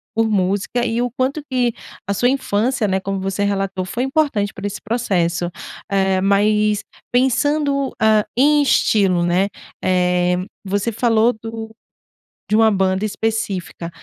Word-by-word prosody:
por 225 0 +2
música 200 +5 0
e 230 +1 0
o 245 - 0
quanto 260 +5 -2
que 245 -2 +1 0.3
a 200 - 0
sua 245 +5 +2
infância, 245 -3 0
né, 190 0 +1
como 195 0 -3
você 195 +1 -2
relatou, 195 -2 -1
foi 235 +7 -3
importante 265 -8 0
para 200 +1 -5
esse 205 - -6
processo. 180 -7 -1 0.4
Eh, 190 -1 +1
mas 210 +1 +2 0.3
pensando, 275 +2 +1
ah, 215 -1 +4
em 295 +2 +5
estilo, 195 -10 +2
né, 180 +3 +2 0.4
eh, 180 -1 +2 0.3
você 205 +3 -1
falou 230 +1 +2
do 225 0 -7 0.8
de 215 - +3
uma 225 0 +5
banda 190 0 +1
específica. 210 -6 -3
210 Hz, 140 wpm, -19 LUFS, 190-240 Hz, 0.8 s, em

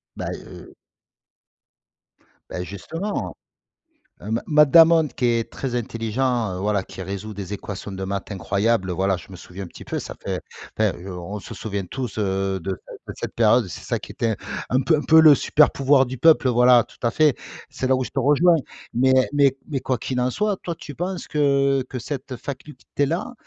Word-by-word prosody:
Bah, - - -4
heu - - -11 1.8
bah, 90 - -4
justement, 165 - -5 0.9
heu, 105 - -7
Ma 115 - 0
Matt 150 -1 +5
Damon, 165 -1 +7
qui 130 - -3
est 115 -1 +1
très 135 -3 -4
intelligent, 115 -1 -1
heu, 90 - -5
voilà, 100 -1 0
qui 95 - -10
résout 100 +3 -5
des 100 -1 -6
équations 100 0 -6
de 95 0 -5
maths 100 +2 -4
incroyables, 100 0 0
voilà, 95 +2 +1
je 85 - -13
me - - -9
souviens 90 +3 -9
un - - -7
petit - - -12
peu. - - -3
Ça - - -7
fait - - -3 0.4
enfin, - - +3 0.2
on 90 +2 -6
se 95 - -9
souvient 100 -2 -4
tous, 125 +4 -5
heu, 95 -1 -1
de 95 +4 -4 0.4
de - - -6
cette - - -5
période. 115 0 +4
C'est - - -8
ça - - -1
qui - - -10
était 115 -2 -1 0.3
un 130 - +2
peu 160 - +3
un - - -2
peu 160 +1 +6
le 155 -2 +9
super 150 +2 +3
pouvoir 135 0 +3
du 130 +1 -6
peuple, 155 -3 +5
voilà, 125 0 +6
tout - - -20
à 115 - +2
fait. 150 0 +3 0.4
C'est 130 - -3
là 130 - +4
où 130 - -1
je - - -6
te - - -1
rejoins, 165 +5 +4 0.4
mais 130 +2 +3 0.2
mais 140 -2 +4
mais 140 -3 -1
quoi 130 0 -1
qu'il 125 +2 -3
en 125 - +1
soit, 210 - 0
toi, 170 -2 -5
tu 145 - -9
penses 180 +4 -4
que, 140 -2 +2
heu, 125 - -2
cette 130 +2 -5
faculté-là, 145 - -4
125 Hz, 195 wpm, -23 LUFS, 100-145 Hz, 1.8 s, le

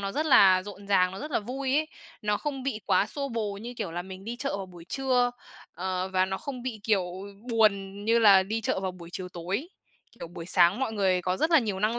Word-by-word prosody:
nó 195 0 -3
rất 305 +4 -1
là 190 -9 +6
rộn 200 0 -10
ràng, 185 -2 +3
nó 190 - -7
rất 300 +2 -6
là - - +1
vui 260 +5 -3
ấy. 310 - +1 0.4
Nó 210 0 +1
không 275 +1 -4
bị 255 -5 -3
quá 205 - +3
xô 275 +5 -4
bồ 220 -4 -2
như 235 +4 -7
kiểu - - -3
là 175 +1 -3
mình 190 +1 -10
đi 235 +2 -5
chợ 275 -5 -2
vào 195 -1 -5
buổi 175 -2 -13
trưa, 250 +2 +1 0.4
ờ, 185 +1 -2
và 185 0 +2
nó 190 0 -3
không 255 -4 -6
bị, 235 -5 -5
kiểu, 205 -3 +2 0.5
buồn 205 -3 +1
như 230 +1 +4
là 200 -4 +7
đi 220 +4 -3
chợ 200 - -1
vào 190 -1 -2
buổi 170 -1 -12
chiều 185 -1 -5
tối. 185 - -4 0.5
Kiểu 165 - -6
buổi 165 -1 -9
sáng 185 +4 +4
mọi 245 -4 -1
người 190 -3 +1
có 180 +1 0
rất 315 - +1
là 325 - +7
nhiều 210 -7 -2
năng 220 +3 +1
205 Hz, 250 wpm, -27 LUFS, 185-245 Hz, 0.5 s, là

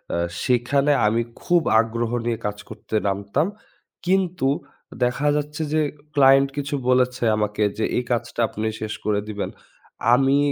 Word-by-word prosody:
আ - - 0 0.3
সেখানে 135 +4 +2 0.2
আমি 115 +2 +2 0.2
খুব 175 -1 +3 0.2
আগ্রহ 115 +1 -1
নিয়ে 115 -1 0
কাজ 105 0 -2
করতে 110 0 -7
নামতাম, 100 - 0 0.6
কিন্তু 180 -6 +1 0.6
দেখা 125 +4 +1
যাচ্ছে 150 +1 -3
যে 155 - +3 0.3
ক্লায়েন্ট 135 -1 +5
কিছু 145 0 -2
বলেছে, 125 -1 +2
আমাকে 105 0 -1
যে 110 - +1
এই 125 - +1
কাজটা 120 0 -2
আপনি 110 - -6 0.2
শেষ 110 -1 -3
করে 105 -1 +1
দিবেন। 105 -2 -4 0.6
আমি 135 +2 +4
125 Hz, 145 wpm, -23 LUFS, 110-140 Hz, 0.6 s, ক্লায়েন্ট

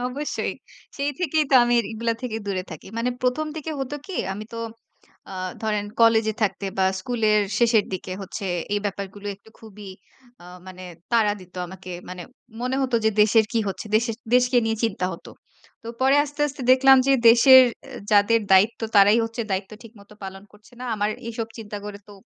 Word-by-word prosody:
অবশ্যই। 285 +4 -3 0.4
সেই 285 +1 -1
থেকেই 315 -3 +1
তো 270 - +4
আমি 240 0 +1 0.2
এগুলা 230 +1 -1
থেকে 235 -3 -4
দূরে 190 -2 -2
থাকি। 160 - -10
মানে 245 +2 0
১ম 255 +5 0
দিকে 315 +1 -5
হত 270 +1 -5
কি? 380 - -6 0.2
আমি 210 +2 -7
তো 230 - -6 0.7
আ - - -7 0.3
ধরেন 210 -2 -1 0.2
কলেজে 225 -1 +4
থাকতে 195 -1 -1
বা 190 - +3 0.2
স্কুলের 215 -1 +1 0.2
শেষের 230 -3 +3
দিকে 185 0 -6
হচ্ছে 195 +2 -7 0.3
এই 205 - 0
ব্যাপারগুলো 200 +1 -6
একটু 210 +2 -21
খুবই 210 -3 -11 0.5
আ - - -14 0.2
মানে 185 0 -10 0.3
তাড়া 220 -3 +3
দিত 185 0 -16
আমাকে। 185 +1 -11 0.2
মানে 180 0 -7 0.4
মনে 255 +2 -1
হত 260 -2 -2
যে 220 - +4
দেশের 220 +1 +4
কি 230 - +1
হচ্ছে, 195 - -6
দেশের 230 0 -1 0.2
দেশকে 250 0 +4
নিয়ে 225 0 0
চিন্তা 195 -5 -1
হত। 170 - -11 0.6
তো 230 - -9
পরে 265 +2 +4
আস্তে, 290 0 -10
আস্তে 275 -1 -8
দেখলাম 265 +1 +6
যে 275 - +4 0.2
দেশের 260 +3 +8 0.5
যাদের 210 +3 +4
দায়িত্ব 200 +6 +4 0.2
তারাই 205 +3 +6
হচ্ছে 225 +1 -4
দায়িত্ব 190 +1 -3
ঠিক 230 -1 -14
মত 200 - -19
পালন 195 0 -8
করছে 210 +3 -21
না। - - -6
আমার 210 0 -1 0.2
এসব 225 -1 -4
চিন্তা 210 -2 -7
করে 205 -1 -7
তো 205 - -12
220 Hz, 185 wpm, -23 LUFS, 200-250 Hz, 0.7 s, দেশের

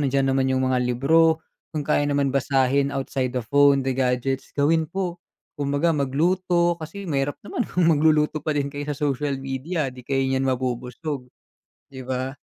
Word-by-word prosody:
nandiyan 135 -1 +1
naman 135 0 +2
yung 130 0 +1
mga 130 - +2
libro, 160 +7 +3 0.3
kung 150 - -1
kaya 145 -1 +2
naman 140 -1 +1
basahin 135 0 +2
outside 135 -1 -2
the 125 - -1
phone, 140 +2 +4
the 135 - 0
gadgets, 130 +1 -1
gawin 160 +3 +2
po. 180 -1 -3 0.4
Kumbaga 145 +4 +1
magluto, 170 +5 +1
kasi 200 +6 -7
mahirap 145 -4 -1
naman 240 +3 -3
kung 180 -2 +1
magluluto 155 -1 +3
pa 150 0 -2
din 140 0 -1
kayo 145 +1 -5
sa 145 - -2
social 140 0 -1
media, 135 +2 -3
'di 125 - -11
kayo 135 +2 -1
niyan 130 0 0
mabubusog, 125 +2 -3 0.6
'di 130 -2 -9
ba? 130 +1 -3
140 Hz, 170 wpm, -24 LUFS, 130-155 Hz, 0.6 s, phone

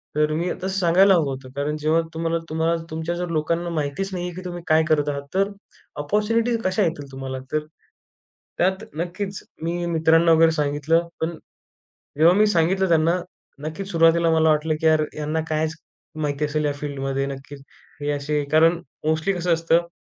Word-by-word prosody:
तर 150 0 +2
मी 170 +3 -1 0.2
तसं - - 0
सांगायला 185 +2 +5
हवं 165 -4 +2
होतं. 130 -1 -7
कारण 145 +2 -1
जेव्हा 155 +2 +2
तुम्हाला 165 +1 -1
तुम्हाला 160 +1 +1
तुमच्या 160 +2 -3
जर 175 0 -3
लोकांना 170 +2 -1
माहितीच 155 +4 -2
नाही 180 -1 -3
आहे, 180 - -5
की 185 - -6
तुम्ही 175 -1 -5
काय 160 0 +4
करत 150 -1 +2
आहात? 140 0 -3
तर 195 +1 +2 0.5
अपॉर्च्युनिटीज 225 +7 +1
कशा 185 +2 +1
येतील 145 -5 -3
तुम्हाला? 130 0 -5
तर 155 - +2 1.0
त्यात 190 +4 +1
नक्कीच. 190 +3 -4 0.2
मी 175 +1 -2
मित्रांना 165 0 +4
वगैरे 165 0 +5
सांगितलं. 150 +2 +1
पण 160 0 -2 0.8
जेव्हा 165 +3 +7
मी 215 0 +5
सांगितलं 190 +1 +2
त्यांना 165 +2 +3 0.5
नक्कीच 190 +5 -6
सुरुवातीला 165 0 +4
मला 160 0 +4
वाटलं 155 +1 +2
की 160 - -2
यार, 155 -1 +4
ह्यांना 155 +1 -2
कायच 155 +1 0 0.5
माहिती 145 +1 -1
असेल 150 +1 -1
या 145 - +1
फील्डमध्ये 135 -1 -3
नक्कीच. 140 0 -8 0.4
हे 145 0 -1
असे 145 +1 -1
कारण 165 +2 +4 0.3
मोस्टली 160 +5 +1
कसं 175 -1 +1
असतं, 165 +1 +2
160 Hz, 170 wpm, -23 LUFS, 150-175 Hz, 1.0 s, जेव्हा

